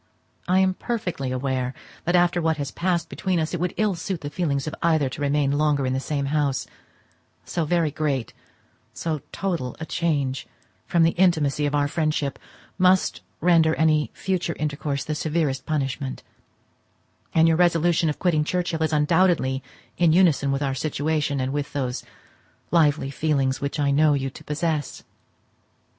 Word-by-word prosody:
I 185 - +3
am 190 0 +3
perfectly 180 - -3
aware 130 -1 -2 0.3
that 175 +1 +2
after 175 0 +3
what 160 -1 +1
has 140 -2 -4
passed 175 -1 -1
between 185 -3 -1
us 155 +2 -2
it 175 - -2
would 180 +1 -2
ill 215 -2 +2
suit 180 0 -4
the 145 -1 -5
feelings 140 -4 -1
of 155 - -4
either 160 -5 +2
to 145 +3 -8
remain 145 -1 +1
longer 145 -1 +1
in 130 - 0
the 130 - 0
same 140 0 -2
house: 145 -3 +1 0.8
so 170 -2 -2
very 165 -1 +1
great, 140 -5 -2 0.6
so 155 -3 -2
total 170 -10 -3
a 160 - -4
change 145 -7 -1 0.4
from 170 -1 +3
the 165 - +4
intimacy 150 -5 +3
of 145 0 0
friendship 155 -3 -1 0.4
must 185 +1 +3 0.2
render 165 -2 +4
any 155 -2 +2
future 185 -3 -2
intercourse 145 -2 -2
the 155 - -3
severest 150 -3 -1
punishment; 135 -3 -2 1.1
and 165 0 +6
your 160 -1 +3
resolution 170 -1 +3
of 150 - -3
quitting 165 -5 +2
Churchhill 175 0 -1
is 160 - +1
undoubtedly 150 -3 +2 0.4
in 170 -3 +5
unison 160 -6 +4
with 135 +1 -1
our 135 -1 0
situation, 150 +1 -1
and 130 +1 -1
with 145 -1 -3
those 130 -3 -2 0.7
lively 150 -4 +3
feelings 140 -3 0
which 140 +2 -3
I 140 -1 +2
know 150 +1 +4
you 135 -1 -2
to - - -12
possess. 155 -1 -2
155 Hz, 160 wpm, -24 LUFS, 140-170 Hz, 1.1 s, and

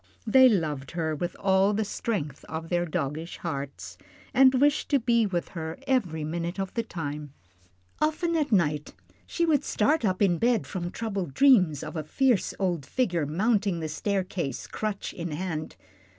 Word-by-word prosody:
They 260 +3 +7
loved 150 - -1
her 160 -2 -1
with 175 +4 -3
all 195 +1 +3
the 220 +1 0
strength 170 - -3
of 160 +1 -6
their 175 0 0
doggish 155 +2 -3
hearts, 140 -5 -6 0.3
and 265 0 +7
wished 290 +1 +2
to 280 - +4
be 235 -2 +2
with 175 -3 -2
her 160 -2 -5
every 195 - 0
minute 170 +4 -3
of 195 -1 -3
the 230 - 0
time. 150 -7 -6 0.7
Often 325 +2 0
at 300 -5 0
night 150 -7 +1 0.3
she 340 - 0
would 305 -4 +2
start 290 +7 +1
up 185 -3 +1
in 175 -5 +3
bed 235 -2 +2
from 175 -2 -4
troubled 195 -8 -4
dreams 190 - +5
of 155 +2 -7
a 155 - -2
fierce 245 - +1
old 175 -6 -1
figure 175 - 0
mounting 200 +2 +1
the 160 - -3
staircase, 185 -2 -2
crutch 215 -2 -4
in 170 0 -5
hand. 160 -1 -4
185 Hz, 165 wpm, -27 LUFS, 160-230 Hz, 0.7 s, They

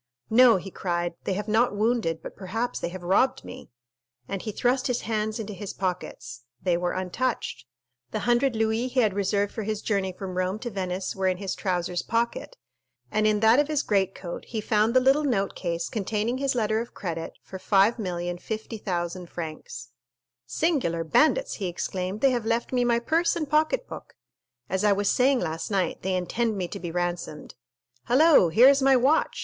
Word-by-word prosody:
"No," 240 0 +7
he 190 +1 -7
cried, 175 -2 -2
"they 195 - 0
have 205 +3 -4
not 220 0 +2
wounded, 210 -6 0
but - - -8
perhaps 225 +6 -3
they - - -3
have 180 0 -8
robbed 195 +9 +2
me!" - - -10 0.6
and 195 -2 -4
he 215 - -4
thrust 250 +4 +1
his 250 -2 -1
hands 215 0 -2
into 215 -1 -5
his 195 0 -6
pockets. 155 -10 -4 0.2
They 180 +2 +1
were 175 0 -1
untouched; 185 - -3 0.4
the - - -3
hundred 240 +1 +2
louis 220 +2 0
he 255 0 +1
had 215 -4 +2
reserved 200 +1 0
for 225 - -4
his 215 0 -3
journey 195 -3 0
from 185 0 -7
Rome 185 +2 0
to 240 +2 -6
Venice 185 -1 -3
were 190 -1 0
in 185 -1 +1
his 195 -1 -3
trousers 180 -2 -2
pocket, 235 - -2 0.5
and 215 0 +2
in 210 -1 +2
that 225 +4 +6
of 290 - +2
his 300 -2 0
greatcoat 190 -3 -2
he 225 - -4
found 215 +2 +1
the - - +8
little 270 +4 +3
note 200 -9 0
case 170 -2 -3
containing 220 +3 -2
his 275 -1 0
letter 220 -2 +1
of 235 - -9
credit 165 -3 -4
for 190 - -9
5,050,000 185 -2 -1
francs. 155 -7 -7 0.6
"Singular 250 - 0
bandits!" 310 - +2
he 195 - -2
exclaimed; 185 +3 -4
"they 270 - +5
have 240 -3 -2
left 230 +2 -1
me 250 -1 +2
my 240 -1 +3
purse 325 +8 +1
and 315 -3 -2
pocket 310 - +1
book. - - -10 0.5
As 190 +5 -1
I 210 -1 +5
was 200 0 +1
saying 260 0 +3
last 160 +1 -3
night, 195 -3 -1
they 190 0 -1
intend 215 +5 -1
me 180 -2 -2
to 200 - -6
be 175 - -5
ransomed. 175 -2 -4 0.5
Hello, 280 - +5
here 230 +10 +7
is 280 0 +5
my 270 0 +5
watch! 270 +6 +2
210 Hz, 190 wpm, -26 LUFS, 180-240 Hz, 0.6 s, the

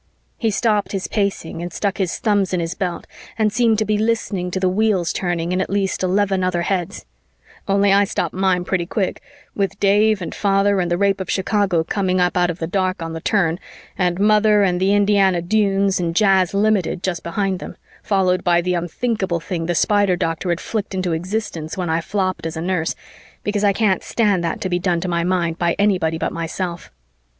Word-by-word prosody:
He 225 - +1
stopped 210 -2 0
his 195 0 -2
pacing 200 -5 -2
and 175 0 -5
stuck 200 -1 -2
his 185 -3 -1
thumbs 205 -4 +1
in - - 0
his 165 0 -2
belt 180 -2 -4 0.3
and 215 -2 +1
seemed 230 -3 +3
to 215 - 0
be 210 0 0
listening 215 -5 -1
to 185 - -2
the 185 - +1
wheels 190 -2 +1
turning 175 -2 -2
in 185 +1 +1
at - - -3
least 195 -1 -1
eleven 190 0 +1
other 175 -1 0
heads 190 +1 -2 0.6
only 200 0 +3
I 200 +1 +5
stopped - - -2
mine 185 -1 +1
pretty 180 -3 -1
quick, 195 -1 -2 0.3
with 200 -1 -2
Dave 205 +1 +3
and 175 - -5
Father 200 0 +2
and 175 -1 0
the 175 - +1
Rape 195 0 +1
of 185 - -6
Chicago 195 -3 +1
coming 185 +1 0
up 180 0 +1
out 175 -1 +2
of 170 - -3
the 165 - -3
dark 185 0 -1
on 165 0 -5
the 165 - -6
turn 175 -5 +1 0.4
and 180 -1 0
Mother 210 0 +4
and 180 -2 +1
the 190 +2 +2
Indiana 200 -3 +3
Dunes 195 +1 +1
and 165 -2 -2
Jazz 195 -2 +3
Limited 200 -4 +1
just 180 -3 -2
behind 190 +1 -2
them, - - -9 0.2
followed 185 -3 +1
by 175 -1 +3
the 180 +1 -1
unthinkable 180 +1 -1
thing 165 -1 -4
the 175 - 0
Spider 205 0 +3
doctor 165 +1 -2
had 170 0 0
flicked 205 -3 -4
into 185 -2 -1
existence 175 -2 -4
when 180 -3 -2
I 165 +1 +1
flopped 185 -2 -2
as 160 0 -6
a - - -3
nurse, 175 -2 -1 0.5
because 205 0 -1
I 205 - +5
can't 200 -2 +1
stand 205 -6 +1
that 165 - -2
to - - -1
be 175 0 0
done 175 -1 0
to 185 - -3
my 170 -1 0
mind 175 -2 0
by 170 -1 +1
anybody 185 -6 +1
but - - -2
myself. 170 +1 -4
190 Hz, 210 wpm, -20 LUFS, 175-200 Hz, 0.6 s, I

